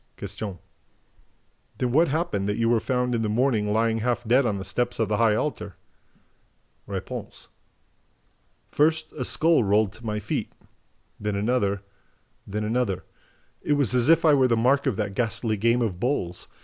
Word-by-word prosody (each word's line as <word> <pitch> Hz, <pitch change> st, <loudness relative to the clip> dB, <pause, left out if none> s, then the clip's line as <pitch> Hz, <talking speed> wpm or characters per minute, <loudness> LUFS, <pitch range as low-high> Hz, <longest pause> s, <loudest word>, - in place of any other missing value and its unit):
Q. 100 Hz, -1 st, -6 dB, 1.2 s
"Then 125 Hz, -1 st, -1 dB
what 160 Hz, +6 st, +4 dB
happened 135 Hz, -, -1 dB
that 105 Hz, -, -1 dB
you 115 Hz, 0 st, +1 dB
were 120 Hz, -1 st, +3 dB
found 125 Hz, +1 st, -1 dB
in 115 Hz, -, 0 dB
the 110 Hz, -, -1 dB
morning 110 Hz, -2 st, +1 dB
lying 115 Hz, +1 st, +1 dB
half 120 Hz, +1 st, -1 dB
dead 125 Hz, +2 st, +4 dB
on 100 Hz, -, -1 dB
the 95 Hz, -, -6 dB
steps 120 Hz, +5 st, -1 dB
of 110 Hz, -2 st, 0 dB
the 105 Hz, -, +1 dB
high 115 Hz, -2 st, +3 dB
altar?" 145 Hz, +3 st, -3 dB, 1.1 s
R. -, -, -3 dB, 1.7 s
"First 155 Hz, +1 st, +1 dB
a 130 Hz, -, -4 dB
skull 160 Hz, +2 st, +3 dB
rolled 105 Hz, 0 st, +2 dB
to 110 Hz, -, -15 dB
my 105 Hz, -2 st, -2 dB
feet... 105 Hz, -, -3 dB, 0.7 s
then 105 Hz, -1 st, -2 dB
another... 100 Hz, -2 st, 0 dB, 0.6 s
then 105 Hz, +2 st, -3 dB
another... 110 Hz, -3 st, -1 dB, 0.6 s
It 150 Hz, -, +1 dB
was 140 Hz, -5 st, +1 dB
as 125 Hz, +2 st, +2 dB
if 165 Hz, 0 st, +5 dB
I 155 Hz, -, +6 dB
were 135 Hz, -2 st, +4 dB
the 115 Hz, -2 st, +2 dB
mark 135 Hz, +5 st, +2 dB
of 130 Hz, -, +1 dB
that 105 Hz, -1 st, -3 dB
ghastly 110 Hz, 0 st, -1 dB
game 115 Hz, +4 st, +2 dB
of 95 Hz, -6 st, -3 dB
bowls. 95 Hz, -9 st, -2 dB
115 Hz, 170 wpm, -25 LUFS, 105-125 Hz, 1.7 s, I